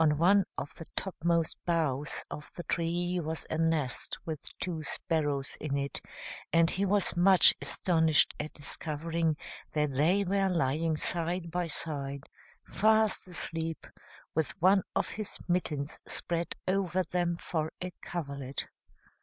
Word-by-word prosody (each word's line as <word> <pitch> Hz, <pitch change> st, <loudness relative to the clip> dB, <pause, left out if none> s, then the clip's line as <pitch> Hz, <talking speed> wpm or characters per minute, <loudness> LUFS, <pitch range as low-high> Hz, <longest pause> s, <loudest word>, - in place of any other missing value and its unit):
On 150 Hz, -2 st, +4 dB
one 190 Hz, +4 st, +5 dB
of -, -, -4 dB
the 165 Hz, -, -10 dB
topmost 170 Hz, -3 st, 0 dB
boughs 155 Hz, -5 st, 0 dB
of 150 Hz, -, -7 dB
the 175 Hz, -, -5 dB
tree 175 Hz, +2 st, 0 dB
was 160 Hz, -1 st, -3 dB
a 155 Hz, -, 0 dB
nest 160 Hz, -6 st, 0 dB
with 155 Hz, -3 st, -4 dB, 0.2 s
two 170 Hz, -3 st, -3 dB
sparrows 145 Hz, -2 st, -1 dB
in 140 Hz, -2 st, -1 dB
it, 140 Hz, -1 st, -3 dB, 0.5 s
and 165 Hz, 0 st, +5 dB
he 195 Hz, +2 st, +1 dB
was 200 Hz, -1 st, +2 dB
much 180 Hz, 0 st, +8 dB
astonished 160 Hz, +2 st, +3 dB
at 150 Hz, +1 st, -3 dB
discovering 160 Hz, +2 st, -2 dB, 0.4 s
that 150 Hz, -2 st, +1 dB
they 170 Hz, +9 st, +3 dB
were 195 Hz, 0 st, +2 dB
lying 160 Hz, -1 st, +1 dB
side 170 Hz, +2 st, -2 dB
by 175 Hz, 0 st, 0 dB
side, 140 Hz, -3 st, -3 dB, 0.4 s
fast 220 Hz, -2 st, +3 dB
asleep, 165 Hz, -2 st, -3 dB, 0.5 s
with 160 Hz, -1 st, -1 dB
one 190 Hz, +3 st, +6 dB
of -, -, +2 dB
his 215 Hz, -2 st, -5 dB
mittens 155 Hz, -5 st, -1 dB
spread 170 Hz, 0 st, -2 dB
over 185 Hz, -1 st, +1 dB
them 175 Hz, 0 st, 0 dB
for 160 Hz, -2 st, -2 dB
a 180 Hz, 0 st, -5 dB
coverlet. 140 Hz, -5 st, -4 dB
165 Hz, 135 wpm, -31 LUFS, 150-180 Hz, 0.5 s, much